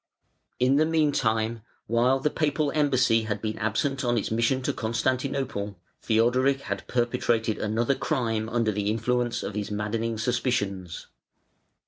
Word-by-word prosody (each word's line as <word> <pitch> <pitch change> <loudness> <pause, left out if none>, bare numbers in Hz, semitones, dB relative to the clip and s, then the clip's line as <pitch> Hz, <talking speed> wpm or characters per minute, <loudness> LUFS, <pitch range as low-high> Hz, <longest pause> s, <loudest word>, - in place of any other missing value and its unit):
In 130 +2 +4
the 155 - +4
meantime, 115 -8 +1 0.2
while 125 +3 +2
the 150 +2 0
Papal 150 -2 0
embassy 130 -7 +2
had 105 -2 -2
been 110 -1 -4
absent 135 +5 -1
on 120 -1 +1
its 110 - -2
mission 115 +4 +1
to - - 0
Constantinople, 125 -3 -2 0.2
Theodoric 125 +5 +2
had 95 -5 -5
perpetrated 120 -2 0
another 115 +5 +1
crime 115 -4 -1
under 115 -2 +1
the 105 0 -1
influence 120 +2 0
of - - -4
his 105 0 -3
maddening 110 +2 -2
suspicions. 105 -7 -2
115 Hz, 135 wpm, -26 LUFS, 110-130 Hz, 0.2 s, In